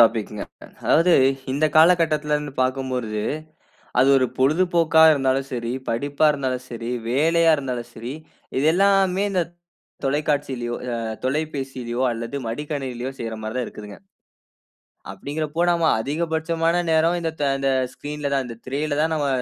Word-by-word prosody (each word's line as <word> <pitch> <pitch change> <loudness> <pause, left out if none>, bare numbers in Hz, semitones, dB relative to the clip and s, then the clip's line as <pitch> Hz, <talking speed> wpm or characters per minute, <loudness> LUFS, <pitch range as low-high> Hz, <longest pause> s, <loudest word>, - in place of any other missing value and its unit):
டாபிக்ங்க. 110 -3 +2 0.4
அதாவது, 170 +2 +4 0.4
இந்த 145 +3 +1
காலகட்டத்தில 155 -3 +4
இருந்து 150 -1 -5
பார்க்கும்பொழுது, 130 -5 -2 0.8
அது 135 - +5
ஒரு 130 - +2
பொழுதுபோக்கா 160 +3 +3
இருந்தாலும் 135 -1 0
சரி, 120 -1 -3 0.2
படிப்பா 145 +6 +1
இருந்தாலும் 130 -3 -3
சரி, 115 0 -5 0.2
வேலையா 165 +5 +4
இருந்தாலும் 125 -3 -4
சரி, 120 +4 -6 0.4
இது 145 - +2
எல்லாமே 195 0 +3
இந்த 180 -3 +1 0.6
தொலைக்காட்சியிலோ 140 -4 -1 0.2
ஆ - - -2 0.3
தொலைபேசிலயோ 135 -4 -2
அல்லது 115 +4 -5
மடிக்கணினிலயோ 130 -1 -4
செய்ற 115 -1 -4
மாதிரி 110 +2 -5
தான் 125 - 0
இருக்குதுங்க. 105 -1 -10 1.1
அப்படின்கிறப்போ, 150 - -4
நம்ம 170 -1 +1 0.2
அதிகபட்சமான 165 +4 0
நேரம், 160 +2 +3
இந்த 165 -1 -1
த - - +2
இந்த 135 0 +1 0.2
ஸ்கிரீன்ல 145 -1 -4
தான் 135 -1 +1
இந்த 115 -1 -8
திரையில 145 +3 -2
தான் 160 +1 +1
நம்ம 145 -2 0
140 Hz, 130 wpm, -23 LUFS, 125-160 Hz, 1.1 s, அது